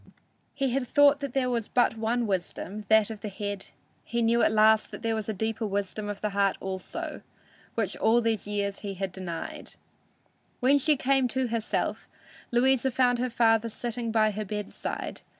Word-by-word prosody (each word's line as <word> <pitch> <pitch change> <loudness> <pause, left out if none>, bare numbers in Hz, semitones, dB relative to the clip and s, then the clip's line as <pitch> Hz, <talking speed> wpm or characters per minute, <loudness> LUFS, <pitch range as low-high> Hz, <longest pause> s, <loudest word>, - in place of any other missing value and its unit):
He 270 -2 0
had 255 0 -1
thought 290 +1 +5
there 270 -2 -1
was 230 -3 -1
but 245 -2 +2
one 230 +2 0
wisdom, 200 +1 -3
that 220 0 +5
of 215 -2 -8
the 210 - -4
head; 205 0 -5 0.4
he 235 0 -1
knew 235 +1 +3
at - - +4
last 220 0 +4
that - - -9
there 225 0 +1
was 220 -1 -3
a - - +2
deeper 220 +2 -2
wisdom 205 +1 -3
of 205 -1 -5
the 210 - -1
heart 200 -1 +2
also, 190 -1 -5 0.5
which 220 -5 -1
all 230 +2 +4
these 225 -3 -1
years 200 -1 -2
he 200 -2 -5
had 190 0 -3
denied! 175 -3 -6 0.8
When 275 +3 +4
she 300 +1 +3
came 270 -1 +2
to 255 0 -1
herself, 225 -1 -2 0.4
Louisa 260 +1 +3
found 250 -1 +2
her 250 +1 0
father 230 -1 +3
sitting 235 +1 -3
by 215 -1 +3
her 215 +1 -4
bedside. 210 0 -5
225 Hz, 180 wpm, -27 LUFS, 205-245 Hz, 0.8 s, thought